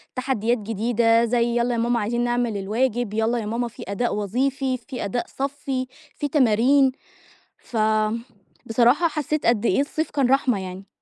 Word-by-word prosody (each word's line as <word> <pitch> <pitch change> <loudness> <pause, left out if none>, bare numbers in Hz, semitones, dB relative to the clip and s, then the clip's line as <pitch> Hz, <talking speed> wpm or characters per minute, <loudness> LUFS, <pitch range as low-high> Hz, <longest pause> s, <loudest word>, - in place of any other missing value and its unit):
تحديات 245 -2 0
جديدة 230 +2 +2
زي 235 0 +1
"يالّا 240 +1 +1
يا - - -1
ماما 235 0 +1
عايزين 235 +3 -1
نعمل 240 -3 0
الواجب، 225 +2 -1
يالّا 225 +2 +1
يا 215 - -4
ماما 235 +3 -2
فيه - - -10
أداء 205 +4 -1
وظيفي، 260 +6 -1
فيه 250 -1 -6
أداء 235 +5 -2
صفِّي، 270 -2 -2 0.3
فيه 290 - -2
تمارين." 265 0 +4 0.7
ف 230 - -8 0.9
بصراحة 245 +9 +3
حسيت 305 -1 -2
قد 235 -1 +2
إيه 275 - +3
الصيف 310 +3 -2
كان 270 -4 +1
رحمة 260 -6 +2
يعني. 190 +1 -8
240 Hz, 160 wpm, -23 LUFS, 225-265 Hz, 0.9 s, تمارين